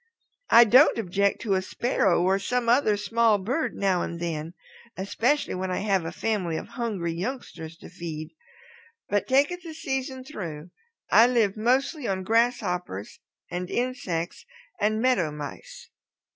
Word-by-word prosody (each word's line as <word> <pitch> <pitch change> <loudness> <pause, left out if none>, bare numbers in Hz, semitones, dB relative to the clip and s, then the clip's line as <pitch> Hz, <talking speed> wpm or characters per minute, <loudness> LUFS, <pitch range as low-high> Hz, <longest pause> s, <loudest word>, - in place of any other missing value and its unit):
I 235 +1 +9
don't 255 +6 +6
object 200 -1 0
to 205 - 0
a 190 - +2
Sparrow 190 -3 +1
or 190 +2 +2
some 245 +4 -1
other 230 -3 +3
small 225 +1 +2
bird 245 +11 -2
now 190 -3 +1
and 170 - -4
then, 165 0 -4 0.4
especially 235 +9 0
when 185 0 -3
I 180 - -1
have 195 -4 +1
a 165 - -3
family 190 -7 -1
of - - -7
hungry 205 -9 -3
youngsters 170 -5 -6
to - - -12
feed. 155 -2 -7 0.8
But 205 0 0
take 275 +5 +3
it 355 0 -6
the 325 -2 -9
season 265 -3 -3
through, 175 - -7 0.4
I 230 - +7
live 230 -6 +2
mostly 255 +5 0
on 190 -1 -1
grasshoppers 185 - 0 0.3
and 180 0 -4
insects 220 -10 -3 0.4
and 215 +1 +1
Meadow 235 -10 +2
Mice. 150 -1 -9
205 Hz, 150 wpm, -26 LUFS, 175-245 Hz, 0.8 s, I